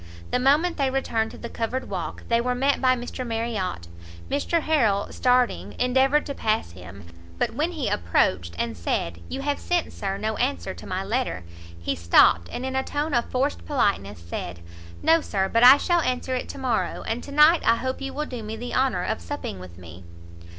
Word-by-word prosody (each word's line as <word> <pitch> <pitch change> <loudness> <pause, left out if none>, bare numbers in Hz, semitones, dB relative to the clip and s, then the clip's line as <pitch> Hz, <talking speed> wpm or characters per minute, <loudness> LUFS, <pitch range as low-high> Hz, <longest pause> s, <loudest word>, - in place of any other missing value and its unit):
The - - +2
moment 295 +7 +3
they 275 -3 +1
returned 230 -4 -1
to - - -11
the 235 - -7
covered 235 +3 -3
walk, - - -5
they 230 0 +2
were 250 +1 -1
met 275 +3 +1
by 255 -1 +4
Mr 245 +1 -5
Marriot; 225 - -3 0.4
Mr 305 +4 +1
Harrel, 230 -11 +2
starting, 250 -1 +1
endeavoured 265 +4 +3
to 280 - -4
pass 215 - -1
him; 90 +2 -12 0.3
but - - 0
when 325 +4 -1
he 290 -8 -2
approached, 85 - +1
and 115 +2 -2
said 85 0 -2
"you 275 - -4
have 285 0 -1
sent, 350 -2 -1
Sir, 195 -1 -3
no 215 +1 -2
answer 90 -1 -1
to 85 - -11
my - - -2
letter!" 90 +2 -2 0.4
he 85 - -2
stopt, 85 0 +4
and 255 - -4
in 265 0 -3
a 265 - +2
tone 290 +3 -3
of 240 -1 +1
forced 265 +3 -1
politeness, 200 - 0
said, 85 +1 -6 0.4
"No, 325 0 +5
Sir, 195 -8 -1
but 230 +4 +2
I 260 +3 +10
shall 345 +2 +2
answer 255 -2 -1
it 250 - -3
to - - -7
morrow, 255 -4 -1
and 225 +2 -3
to 285 - -10
night 300 +3 +6
I 230 - +4
hope 260 +3 -3
you 270 0 -4
will 300 +2 -3
do 250 -5 -6
me 215 +1 -5
the 245 +2 -6
honour 255 -9 +1
of 90 - -2
supping 85 +2 -5
with 90 -2 -11
me." 85 0 -12
245 Hz, 205 wpm, -25 LUFS, -, 0.4 s, I